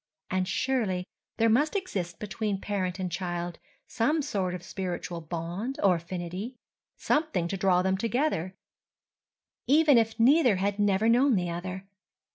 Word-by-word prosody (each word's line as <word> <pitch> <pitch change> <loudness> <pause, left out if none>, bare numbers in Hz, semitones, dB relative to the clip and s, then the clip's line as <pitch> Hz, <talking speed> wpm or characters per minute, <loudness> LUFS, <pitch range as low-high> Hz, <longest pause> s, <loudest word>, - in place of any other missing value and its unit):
And 185 0 0
surely 195 -5 0 0.3
there 225 0 +3
must 285 - +3
exist 190 - -3
between 210 -1 -2
parent 190 -3 -2
and 185 -2 -3
child 175 -1 -3 0.3
some 295 +6 0
sort 190 -9 -1
of 175 - -8
spiritual 180 -2 -4
bond 175 - -4
or 195 -2 +6
affinity, 180 +7 -6 0.4
something 295 - 0
to 195 - -2
draw 180 -1 +3
them 190 0 +1
together—even 250 - -1
if 225 0 -1
neither 255 -1 +5
had 200 +2 -1
never 205 +1 +2
known 245 +2 +4
the 175 -2 -1
other. 185 +2 -5
195 Hz, 135 wpm, -28 LUFS, 180-235 Hz, 0.4 s, or